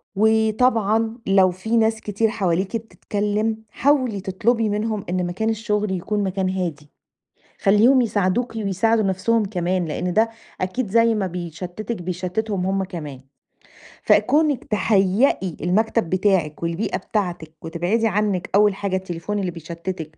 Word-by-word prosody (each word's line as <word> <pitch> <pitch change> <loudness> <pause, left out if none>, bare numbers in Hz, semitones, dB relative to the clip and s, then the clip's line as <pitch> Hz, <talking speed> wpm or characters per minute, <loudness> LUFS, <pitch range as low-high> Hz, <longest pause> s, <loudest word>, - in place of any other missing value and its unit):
وطبعًا 220 +1 +2
لو 190 -1 +5
في 220 +6 -1
ناس 220 0 +2
كتير 210 +2 0
حواليكِ 190 0 0
بتتكلِّم، 215 0 -2
حاولي 255 -8 +1
تطلُبي 220 +4 0
منهم 210 0 -2
إن 180 0 0
مكان 190 +6 -2
الشُغل 210 -2 -1
يكون 200 +3 -1
مكان 190 0 -1
هادي. 165 -6 -4 0.7
خلّيهم 225 +6 +5
يساعدوكِ 220 +2 0
ويساعدوا 220 +2 +1
نَفْسهم 200 +3 +1
كمان، 180 -2 -1
لإن 175 +3 -2
ده 220 +3 +3 0.3
أكيد 195 +5 -2
زي 230 +1 +4
ما 200 -3 -1
بيشتِّتِك 180 +5 -6
بيشتِّتِهم 185 +3 -2
هم 195 0 0
كمان. 150 -8 -7 0.8
فكُونِك 295 -3 +3
تهيّئي 195 - +1
المكتب 210 +1 +1
بتاعِك 185 -5 +1
والبيئة 170 +5 -1
بتاعتِك 175 -7 -3
وتبعدي 180 +8 0
عنِّك 205 -3 0
أول 205 -1 +4
حاجة 195 -1 -2
التليفون 190 +2 -3
اللي 185 -3 -2
بيشتِّتِك 165 -1 -7
200 Hz, 130 wpm, -22 LUFS, 180-220 Hz, 0.8 s, لو